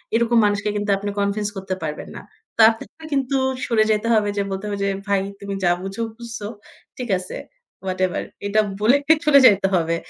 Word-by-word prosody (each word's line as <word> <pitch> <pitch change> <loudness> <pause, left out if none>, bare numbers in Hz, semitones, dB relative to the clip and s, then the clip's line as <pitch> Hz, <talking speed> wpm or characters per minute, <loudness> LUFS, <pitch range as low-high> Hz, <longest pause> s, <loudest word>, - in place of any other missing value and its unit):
এরকম 235 +1 +3
মানুষকে 205 0 0
কিন্তু 205 0 -2
আপনি 205 +1 -4
কনভিন্স 200 +1 0
করতে 190 0 -3
পারবেন 150 -1 -5
না। - - -7 0.4
তার 220 0 +8 0.4
কিন্তু 275 -1 0 0.3
সরে 225 -2 +3
যাইতে 215 +1 +1
হবে 210 -2 +2
যে - - +2
বলতে 195 +1 -4
হবে 205 - -3
যে - - +1 0.2
"ভাই 200 -1 +2 0.2
তুমি 200 0 -5
যা 175 - +4
বুঝো 195 +4 -5 0.2
বুঝছো, 230 -3 -7 0.5
ঠিক 250 -2 -5
আছে। 185 - -7 0.5
ওয়াটেভার" 185 -1 -1 0.2
এটা 215 +2 +3 0.2
বলে 235 +5 +5 0.3
চলে 290 -2 +7
যাইতে 195 -4 +6
হবে। 165 -1 +1
205 Hz, 180 wpm, -21 LUFS, 195-225 Hz, 0.5 s, তার